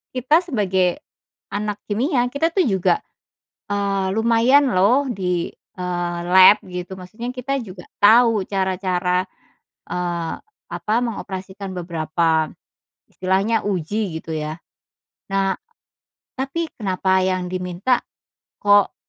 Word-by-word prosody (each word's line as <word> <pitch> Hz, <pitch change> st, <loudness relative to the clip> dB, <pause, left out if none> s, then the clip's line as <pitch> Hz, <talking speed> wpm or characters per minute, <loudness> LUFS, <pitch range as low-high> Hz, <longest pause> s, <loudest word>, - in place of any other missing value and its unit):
kita 280 Hz, +7 st, +3 dB
sebagai, 190 Hz, -, 0 dB, 0.6 s
anak 210 Hz, 0 st, -2 dB
kimia 245 Hz, +4 st, +1 dB
kita 320 Hz, +4 st, +1 dB
tuh 365 Hz, 0 st, +1 dB
juga, 195 Hz, -, +2 dB, 0.7 s
eee, 200 Hz, -1 st, 0 dB
lumayan 235 Hz, +5 st, +4 dB
loh 245 Hz, +9 st, +3 dB
di, 180 Hz, -4 st, -2 dB, 0.2 s
eee, 175 Hz, -2 st, -2 dB
lab 185 Hz, +4 st, +7 dB
gitu, 180 Hz, +1 st, -6 dB
maksudnya 190 Hz, +6 st, -8 dB
kita 275 Hz, +2 st, -2 dB
juga 190 Hz, -6 st, -9 dB, 0.2 s
tau 225 Hz, +1 st, +6 dB
cara-cara, 185 Hz, -1 st, 0 dB, 0.6 s
eee, 175 Hz, -2 st, -2 dB, 0.4 s
apa, 215 Hz, -, -2 dB
mengoperasikan 195 Hz, -3 st, -5 dB
beberapa, 165 Hz, -2 st, 0 dB, 0.6 s
istilahnya 195 Hz, +4 st, +1 dB
uji 190 Hz, -1 st, -2 dB
gitu 165 Hz, -, -11 dB
ya. 155 Hz, +2 st, -4 dB, 0.8 s
Nah, 195 Hz, 0 st, +1 dB, 0.8 s
tapi 275 Hz, +6 st, -2 dB
kenapa 190 Hz, -2 st, +1 dB
yang 185 Hz, -1 st, -1 dB
diminta, 185 Hz, +7 st, 0 dB, 0.6 s
kok, 205 Hz, -1 st, +4 dB
195 Hz, 105 wpm, -21 LUFS, 180-230 Hz, 0.8 s, lab